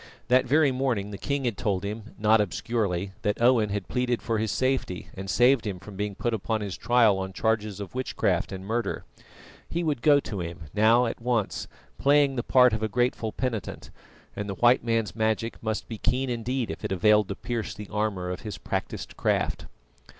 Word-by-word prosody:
That 125 +1 +4
very 145 +1 +4
morning 125 -6 -1
the 100 - -6
king 140 +4 -2
had 115 -6 -2
told 100 -4 0
him 105 +2 -6
not 110 0 +4
obscurely 100 -2 -1
that 105 0 -1
Owen 120 -3 +4
had 100 -1 -3
pleaded 125 -1 0
for 115 -2 -1
his 110 -2 -1
safety 130 -8 -1
and 95 0 -7
saved 125 0 +4
him 95 -3 -3
from 95 +2 -11
being 105 0 -3
put 120 +3 -1
upon 110 +1 -1
his 100 -3 -4
trial 115 -5 +3
on 95 0 -4
charges 110 -2 -1
of 100 - -7
witchcraft 95 -8 0
and 95 0 -6
murder. 115 +3 -2 0.7
He 170 +1 -1
would 150 -7 -1
go 145 +1 +6
to 105 -7 -5
him, 85 0 -6
now 115 +4 +5
at 115 - -4
once, 115 -4 -1 0.3
playing 140 -1 +4
the 120 - 0
part 125 -1 +5
of 110 - -1
a 110 - +1
grateful 115 0 0
penitent, 115 -6 -4 0.4
and 105 0 -4
the 100 - -3
White 120 +4 +4
Man's 115 -3 0
magic 110 +1 -1
must 110 -1 -3
be 110 -3 -7
keen 130 +1 0
indeed 120 0 -2
if 80 - -8
it - - -3
availed 105 +2 +4
to 100 - -4
pierce 120 -2 -4
the 105 0 -8
armour 100 -4 -1
of 90 - -5
his 105 - -6
practised - - -4
craft. - - 0
110 Hz, 200 wpm, -26 LUFS, 100-125 Hz, 0.7 s, go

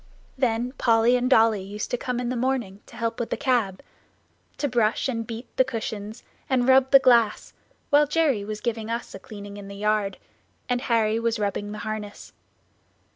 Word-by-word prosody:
Then 245 -1 0
Polly 230 +1 +4
and 250 0 +1
Dolly 225 -5 +4
used 205 +2 -6
to - - +2
come 250 0 -3
in 245 -1 -2
the 255 - -2
morning 240 -6 -2
to - - -14
help 230 0 -3
with 235 - -2
the - - -2
cab 235 -9 0 0.7
to 290 - 0
brush 235 -1 +1
and 230 -3 -3
beat 235 +1 -7
the 260 - +6
cushions, 220 -3 -5 0.3
and 255 -2 +2
rub 265 0 +5
the 275 - +9
glass, 235 -5 +3 0.4
while 295 +1 +5
Jerry 295 -8 +1
was 210 +1 -6
giving 225 -2 -3
us 235 +1 -4
a 195 - -8
cleaning 205 0 -10
in 200 -1 -9
the 200 - -9
yard, 210 -1 0 0.5
and 245 -1 0
Harry 225 -3 +1
was 230 0 0
rubbing 205 0 -2
the 210 - -6
harness. 215 -1 -6
230 Hz, 185 wpm, -25 LUFS, 210-250 Hz, 0.7 s, the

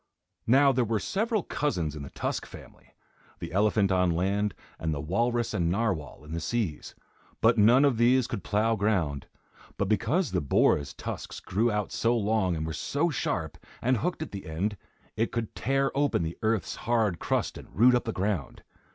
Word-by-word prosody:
Now 135 +4 +6
there 125 -1 +1
were 115 -1 0
several 215 - -1
cousins 85 - -2
in 75 - -6
the 70 - -7
Tusk - - -3
family. - - -14 0.4
The - - -7
elephant 100 +1 +2
on 90 -1 +3
land, 100 +4 0 0.2
and 80 - -2
the - - -4
walrus 115 - 0
and 85 -5 +1
narwhal 90 - -2
in 75 - -11
the 85 - -2
seas; 95 -3 -3 0.4
but 115 0 +4
none 120 +7 +6
of 135 -5 +2
these 125 +2 +4
could 95 - -5
plough 110 +2 +1
ground, 95 -10 0 0.5
but 100 - 0
because 145 - +1
the 90 -2 0
boar's 70 0 +2
tusks - - -6
grew 115 +5 0
out 105 -1 -2
so 120 +1 +1
long 105 -4 +1
and 80 0 -3
were 80 - -4
so 145 - 0
sharp, - - -2 0.2
and 125 +1 +2
hooked 175 +3 -2
at - - -9
the 100 -1 -7
end, 95 +7 -2 0.4
it 115 +1 0
could 115 -2 -3
tear 135 +2 0
open 140 -10 +1
the 80 +1 -4
earth's 110 -2 0
hard 110 -7 0
crust - - -1
and - - -10
root 125 +4 +6
up 125 - +1
the 115 - -1
ground. 95 -7 -3
105 Hz, 185 wpm, -28 LUFS, 90-120 Hz, 0.5 s, Now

